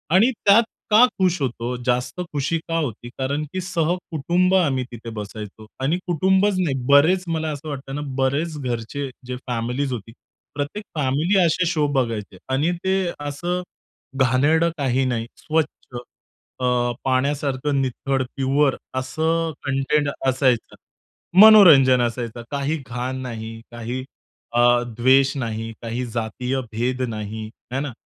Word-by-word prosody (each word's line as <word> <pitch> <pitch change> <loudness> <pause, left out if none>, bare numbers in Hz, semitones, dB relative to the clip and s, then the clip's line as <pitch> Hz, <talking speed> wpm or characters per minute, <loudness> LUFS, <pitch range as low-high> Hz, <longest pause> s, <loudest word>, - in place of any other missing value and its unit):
आणि 230 +7 +5
त्यात 205 +3 +7 0.3
का 215 +3 +7 0.2
खुश 185 -2 +2
होतो? 120 -1 -2
जास्त 125 +8 0
खुशी 145 +3 0
का 165 0 -1
होती 120 -6 -3
कारण 140 +3 -1
की 185 - -2
सहकुटुंब 175 0 0
आम्ही 140 -8 +2
तिथे 115 -1 -8
बसायचो. 105 +1 -8 0.2
आणि 150 +6 +1
कुटुंबच 190 +4 +2
नाही, 155 -7 0
बरेच 160 +7 +5
मला 160 -1 -1
असं 150 +1 -7
वाटतं 135 -1 -6
ना, 145 - -3 0.2
बऱ्याच 150 +4 0
घरच्या 125 +3 -3 0.2
जे 125 - -3
फॅमिलीज 125 +3 -2
होत्या. 115 -1 -7 0.4
प्रत्येक 145 +9 -4
फॅमिली 150 +7 +1
असे 170 +2 +2
शो 155 -4 +1
बघायचे 110 -7 -2 0.2
आणि 150 +6 +2
ते 190 0 +2 0.2
असं 145 +5 -3 0.6
घाणेरडं 150 +7 +3
काही 135 -1 +1
नाही. 115 -2 -1
स्वच्छ 160 -1 0 0.9
अ, 125 - -1 0.4
पाण्यासारखं 140 +1 0
नितळ, 135 +1 -1
प्युअर 135 +1 +2 0.2
असं 160 +5 0
कंटेंट 140 +2 +1 0.2
असायचं. 130 -2 +1 0.7
मनोरंजन 160 - +8
असायचं. 120 0 -3
काही 145 +3 -1
घाण 125 +2 -3
नाही. 115 -2 -6
काही 120 +2 -5 0.5
अ, 120 - +2 0.4
द्वेष 135 +3 +4
नाही, 115 -2 -3
काही 120 +2 -3
जातीय 120 +3 -3
भेद 125 +3 -1
नाही, 110 0 -5 0.3
हे 135 - 0
ना? 145 -1 -3
135 Hz, 135 wpm, -22 LUFS, 125-160 Hz, 0.9 s, मनोरंजन